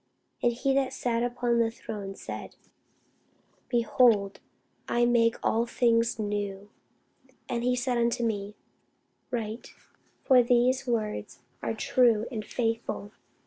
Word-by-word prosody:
And 240 Hz, -, +3 dB
he 260 Hz, +3 st, 0 dB
that 270 Hz, -1 st, +1 dB
sat 235 Hz, -2 st, -1 dB
upon 240 Hz, 0 st, 0 dB
the 230 Hz, -1 st, +3 dB
throne 205 Hz, -3 st, -7 dB
said, -, -, -8 dB, 1.1 s
Behold, 230 Hz, -4 st, +3 dB, 0.5 s
I 240 Hz, 0 st, +3 dB
make 235 Hz, -1 st, +3 dB
all 230 Hz, +2 st, +1 dB
things 230 Hz, -1 st, +2 dB
new. 205 Hz, -1 st, -3 dB, 0.8 s
And 235 Hz, -1 st, -2 dB
he 250 Hz, 0 st, +2 dB
said 250 Hz, -1 st, 0 dB
unto 235 Hz, 0 st, +1 dB
me, 205 Hz, -2 st, -3 dB, 0.7 s
Write: 225 Hz, -2 st, -5 dB, 0.5 s
for 255 Hz, -2 st, +6 dB
these 245 Hz, +2 st, +2 dB
words 220 Hz, -3 st, -2 dB, 0.2 s
are -, -, -2 dB
true 235 Hz, -4 st, +3 dB
and 220 Hz, -3 st, -4 dB
faithful. 225 Hz, -3 st, -3 dB
235 Hz, 120 wpm, -28 LUFS, 215-245 Hz, 1.1 s, for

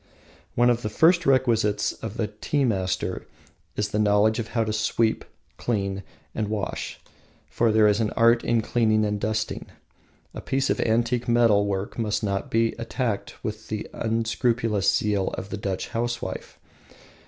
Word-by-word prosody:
One 120 Hz, +1 st, +5 dB
of 120 Hz, 0 st, 0 dB
the 110 Hz, -, -3 dB
first 165 Hz, -, +4 dB
requisites 115 Hz, -6 st, +2 dB
of 115 Hz, 0 st, -8 dB
a 110 Hz, -, +2 dB
tea 110 Hz, +7 st, -1 dB
master 95 Hz, -6 st, -1 dB, 0.5 s
is 105 Hz, 0 st, -1 dB
the 105 Hz, -, -1 dB
knowledge 105 Hz, +1 st, +3 dB
of 115 Hz, -, -3 dB
how 115 Hz, -, +3 dB
to 110 Hz, -1 st, -2 dB
sweep, 110 Hz, +1 st, +1 dB, 0.3 s
clean, 100 Hz, -4 st, -2 dB, 0.3 s
and 110 Hz, -1 st, -2 dB
wash, 105 Hz, -2 st, -4 dB, 0.5 s
for 115 Hz, -1 st, +2 dB
there 110 Hz, 0 st, +5 dB
is 105 Hz, +1 st, +3 dB
an 110 Hz, -2 st, +1 dB
art 115 Hz, 0 st, +5 dB
in 120 Hz, -1 st, +2 dB
cleaning 110 Hz, -2 st, +2 dB
and 105 Hz, 0 st, -1 dB
dusting. 110 Hz, +1 st, -2 dB, 0.7 s
A -, -, -7 dB
piece 135 Hz, 0 st, 0 dB
of -, -, -1 dB
antique 120 Hz, +2 st, +1 dB
metal 115 Hz, -4 st, +4 dB
work 100 Hz, +3 st, -3 dB
must 110 Hz, -2 st, -1 dB
not 100 Hz, -1 st, -2 dB
be 115 Hz, 0 st, +2 dB
attacked 115 Hz, -2 st, -3 dB
with 110 Hz, 0 st, -5 dB
the 110 Hz, -1 st, -4 dB
unscrupulous 115 Hz, -2 st, +1 dB
zeal 105 Hz, -3 st, 0 dB
of 95 Hz, -, -6 dB
the 110 Hz, -, -3 dB
Dutch 100 Hz, -2 st, -3 dB
housewife. 115 Hz, -4 st, -4 dB
110 Hz, 160 wpm, -25 LUFS, 105-115 Hz, 0.7 s, One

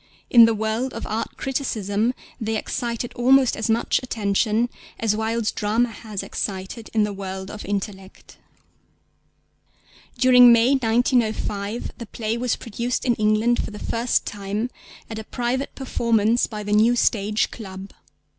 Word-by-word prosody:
In 235 Hz, -2 st, +9 dB
the 225 Hz, 0 st, +2 dB
world 220 Hz, +4 st, -2 dB
of -, -, -5 dB
art 220 Hz, +2 st, -4 dB
criticism 230 Hz, -4 st, -1 dB, 0.2 s
they 220 Hz, -1 st, -2 dB
excited 235 Hz, +1 st, -3 dB
almost 260 Hz, +1 st, +4 dB
as 220 Hz, -, -3 dB
much 225 Hz, +1 st, +2 dB
attention 220 Hz, -1 st, 0 dB, 0.3 s
as 220 Hz, -2 st, +1 dB
Wilde's 220 Hz, 0 st, -1 dB
drama 225 Hz, +3 st, 0 dB
has 215 Hz, -2 st, -6 dB
excited 195 Hz, +3 st, -5 dB
in 215 Hz, -, +4 dB
the 210 Hz, -1 st, -2 dB
world 190 Hz, 0 st, -6 dB
of 210 Hz, -, -8 dB
intellect. 195 Hz, -1 st, -6 dB, 1.8 s
During 250 Hz, -1 st, +7 dB
May 235 Hz, +2 st, +5 dB
1905 225 Hz, -4 st, 0 dB
the 235 Hz, -, -7 dB
play 220 Hz, 0 st, -3 dB
was 245 Hz, 0 st, 0 dB
produced 235 Hz, +1 st, -3 dB
in 245 Hz, -, +3 dB
England 215 Hz, +2 st, +2 dB
for -, -, -5 dB
the 210 Hz, -, -9 dB
first 230 Hz, +3 st, 0 dB
time 205 Hz, +4 st, -3 dB, 0.4 s
at 220 Hz, -1 st, -6 dB
a -, -, -6 dB
private 245 Hz, +4 st, -3 dB
performance 235 Hz, -3 st, +1 dB
by 210 Hz, -2 st, -6 dB
the 205 Hz, 0 st, -2 dB
New 225 Hz, +3 st, +4 dB
Stage 210 Hz, -2 st, +1 dB
Club. 195 Hz, -3 st, -9 dB
225 Hz, 145 wpm, -23 LUFS, 210-240 Hz, 1.8 s, In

